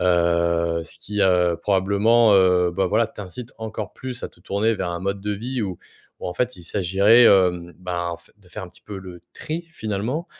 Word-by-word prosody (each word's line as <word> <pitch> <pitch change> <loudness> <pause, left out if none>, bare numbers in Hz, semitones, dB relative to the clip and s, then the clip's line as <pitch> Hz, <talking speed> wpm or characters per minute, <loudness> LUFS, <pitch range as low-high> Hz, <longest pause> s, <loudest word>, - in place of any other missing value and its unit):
Heu, 85 -1 +2
ce - - -8
qui 105 0 -4
heu, 90 -3 +3
probablement, 105 +4 +3
heu, 90 -2 +4
bah, 95 +2 0
voilà, 110 +4 +2
t'incite 105 +6 -8
encore 110 -1 -5
plus 130 -2 -7
à - - -4
te 85 - -25
tourner 105 +5 0
vers 95 -3 -3
un 85 0 -4
mode 100 +1 -2
de 105 +1 -2
vie 120 +5 -4
où 95 -5 -3 0.4
où - - -5
en 90 - -4
fait, 125 +5 -1
il 85 - -13
s'agiraitn 100 +6 +5
hem, 90 -3 +2
ben 90 -1 -3
en 85 - -5
f 85 - -21
de 95 -3 -22
faire 90 - -7
un - - -11
petit - - -17
peu 100 -2 -8
le 90 -2 -11
tri 165 +2 -5
finalement 115 - -3
95 Hz, 215 wpm, -22 LUFS, 90-110 Hz, 0.4 s, s'agiraitn